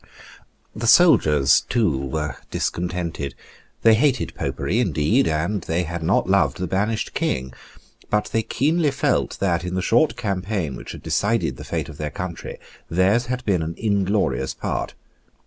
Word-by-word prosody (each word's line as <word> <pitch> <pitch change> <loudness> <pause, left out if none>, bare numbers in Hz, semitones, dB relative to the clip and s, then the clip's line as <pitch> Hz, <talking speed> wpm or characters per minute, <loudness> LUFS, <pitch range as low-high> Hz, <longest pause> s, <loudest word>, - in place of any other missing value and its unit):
The 115 +2 -3
soldiers, 75 - +5
too, 105 - +2
were 70 +1 -3
discontented. 85 -5 -3 0.5
They 115 - +7
hated 130 +1 +1
Popery 105 +7 -2
indeed; 105 - +2
and 85 +6 -1
they 85 +2 -1
had 85 0 -5
not 85 +5 +1
loved 100 +1 +2
the 90 - -2
banished 105 +5 -1
King. 65 0 -2 0.6
But 105 0 0
they 115 - +1
keenly 155 +7 +1
felt 135 - 0
that, 90 -3 +1
in 90 0 -3
the 95 - 0
short 120 +7 +3
campaign 95 - -2
which - - -8
had - - -10
decided 115 +3 0
the - - -8
fate - - -3
of 75 -1 -11
their 75 -1 -2
country, 90 +2 -6 0.3
theirs 95 +8 +2
had 125 0 -3
been 95 -5 +1
an 80 +1 -4
inglorious 100 - 0
part. - - -3
95 Hz, 155 wpm, -22 LUFS, 80-115 Hz, 0.6 s, They